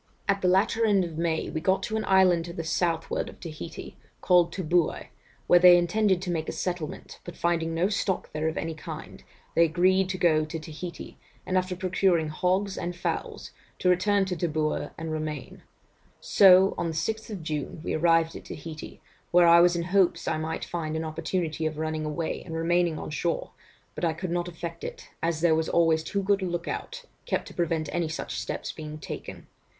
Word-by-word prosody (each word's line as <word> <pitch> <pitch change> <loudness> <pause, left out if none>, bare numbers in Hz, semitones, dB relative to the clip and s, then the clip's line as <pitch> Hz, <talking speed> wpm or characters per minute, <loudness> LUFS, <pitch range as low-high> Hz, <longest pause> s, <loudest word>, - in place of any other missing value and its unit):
'At 200 -1 +1
the 185 - +2
latter 195 +5 +3
end 200 -4 +3
of 165 -2 -7
May, 165 -1 -1
we 155 - -3
got 190 +3 +1
to 220 - -3
an 220 - 0
island 185 -3 +4
to 170 - -7
the 165 - -4
southward 165 0 -1
of - - -14
Taheité, 160 0 -8 0.3
called 175 -2 +4
Tooboui, 175 -2 0 0.4
where 175 - +6
they 180 0 +9
intended 185 +1 +2
to 180 - -2
make 160 -2 -2
a - - -1
settlement, 175 -4 -5
but 175 - -9
finding 165 -1 0
no 170 +3 +2
stock 200 -2 -2
there 155 +1 -1
of 160 - -2
any 165 0 -2
kind, 155 0 -9 0.3
they 170 - +5
agreed 185 +3 +3
to 190 - -2
go 160 -4 +3
to 155 +2 -5
Taheité, 160 +2 -8 0.3
and, 185 - -2
after 185 0 0
procuring 180 -3 +1
hogs 185 +5 0
and 175 0 -4
fowls, 175 - -4 0.3
to 180 - +1
return 195 +2 +3
to 185 -1 -3
Tooboui 155 -3 -1
and 160 0 -5
remain. 155 -3 -5 0.6
So, 190 0 +6
on 170 - 0
the 165 - -3
6th 215 +5 -3
June, 155 0 -4
we - - -2
arrived 165 0 +3
at - - -9
Taheité, 155 0 -8 0.3
where 175 0 +5
I 170 0 +8
was 175 0 +4
in 170 - -1
hopes 185 0 +2
I 155 - 0
might 160 +1 -3
find 160 -2 -4
an 160 - -2
opportunity 160 0 -2
of 155 -1 -5
running 155 0 -2
away, 160 +2 -3
and 165 -2 -7
remaining 170 0 +1
on - - -6
shore, 170 +2 -2 0.4
but - - -7
I 165 -2 +2
could 170 +2 -5
not 175 0 -1
effect 170 -1 -7
it, - - -7
as 165 -1 -1
there 170 -2 +4
was 160 0 0
always 165 -2 +3
too 200 +5 -2
good 200 0 +2
a - - -1
look 175 -1 -3
out 485 +1 -5 0.2
kept - - -1
to - - -12
prevent 165 -2 -1
any 170 -2 0
such 160 - -4
steps - - -4
being 155 -1 -8
taken. - - -8
170 Hz, 200 wpm, -27 LUFS, 160-185 Hz, 0.6 s, they